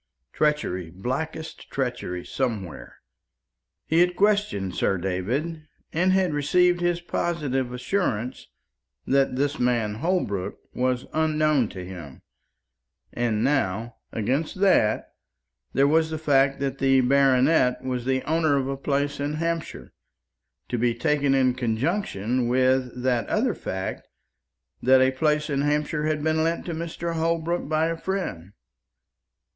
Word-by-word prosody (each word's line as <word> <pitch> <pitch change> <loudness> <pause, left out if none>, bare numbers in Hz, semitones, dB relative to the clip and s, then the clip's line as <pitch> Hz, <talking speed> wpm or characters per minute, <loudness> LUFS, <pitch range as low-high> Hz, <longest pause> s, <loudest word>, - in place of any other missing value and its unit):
Treachery, 150 - 0
blackest 135 - -5
treachery 120 -9 -3
somewhere. 110 - -4 0.9
He 160 - +2
had 180 0 +3
questioned 200 - +1
Sir 95 - +1
David, 125 - -3 0.3
and 180 +4 +2
had 185 -4 +2
received 175 +5 +3
his 175 0 +1
positive 145 -7 -2
assurance 125 - -2 0.6
that 135 -1 +2
this 140 +2 -1
man 120 -4 +1
Holbrook 160 - -1 0.2
was 125 0 0
unknown 155 -5 +2
to 90 -1 -7
him; 90 -7 -10 0.9
and 115 -3 0
now, 120 -4 0
against 135 - -1
that 145 - +3 0.6
there 140 +1 +4
was 160 +2 +3
the 160 - -3
fact 135 -3 +2
that 135 -1 -2
the 135 -1 +4
baronet 130 0 +3
was 125 -2 -2
the 130 0 0
owner 160 -2 +2
of 135 -1 -1
a 135 0 -3
place 140 +1 -1
in 145 +1 -2
Hampshire, 165 +1 -3 0.8
to 120 - -1
be 120 0 +1
taken 145 +1 +1
in 130 -2 +3
conjunction 125 - -1
with 130 0 +1
that 125 -2 +1
other 230 +1 +1
fact 95 - -5 0.7
that 130 +1 +5
a 130 0 +4
place 150 +2 +1
in 140 -2 0
Hampshire 150 +1 0
had 155 -1 -1
been 160 0 +2
lent 165 +1 -1
to 170 - -3
Mr. 170 +1 -4
Holbrook 165 0 -1
by 155 0 +2
a 165 0 -1
friend. 165 - -4
140 Hz, 130 wpm, -25 LUFS, 125-160 Hz, 0.9 s, that